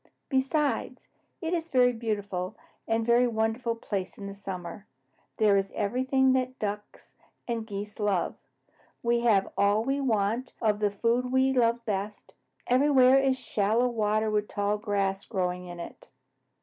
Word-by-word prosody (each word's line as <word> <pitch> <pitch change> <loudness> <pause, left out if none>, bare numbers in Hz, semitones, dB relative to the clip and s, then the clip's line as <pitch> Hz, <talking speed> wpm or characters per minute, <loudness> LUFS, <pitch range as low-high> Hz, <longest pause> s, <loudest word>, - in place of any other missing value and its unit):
Besides, 280 +2 0 0.3
it 330 0 -2
is 330 -2 -1
a - - -33
very 250 -1 +4
beautiful 205 -5 -3 0.3
and 225 0 +1
a - - -5
very 240 +1 +4
wonderful 225 +1 -1
place 200 -4 -4
in 200 -1 -7
summer. 190 -1 -7 0.5
There 210 -2 +4
is 195 0 0
everything 260 +4 +2
that 255 0 -1
Ducks 210 0 -6 0.3
and 230 -2 -3
Geese 205 0 -6
love. 205 -4 0 0.7
We 235 0 +2
have 220 -5 +2
all 205 +2 +3
we 270 +3 -1
want 230 0 0
of 210 -2 +1
the 210 -1 +2
food 235 +5 0
we 260 0 +3
love 235 -2 +2
best. 205 0 -4 0.3
Everywhere 260 0 +5
is 270 -1 +2
shallow 225 +2 +1
water 215 -1 0
with 210 0 0
tall 205 +1 -1
grass 200 -2 -1
growing 180 -3 -3
in 175 0 -8
it." 170 - -9
220 Hz, 150 wpm, -28 LUFS, 200-250 Hz, 0.7 s, Everywhere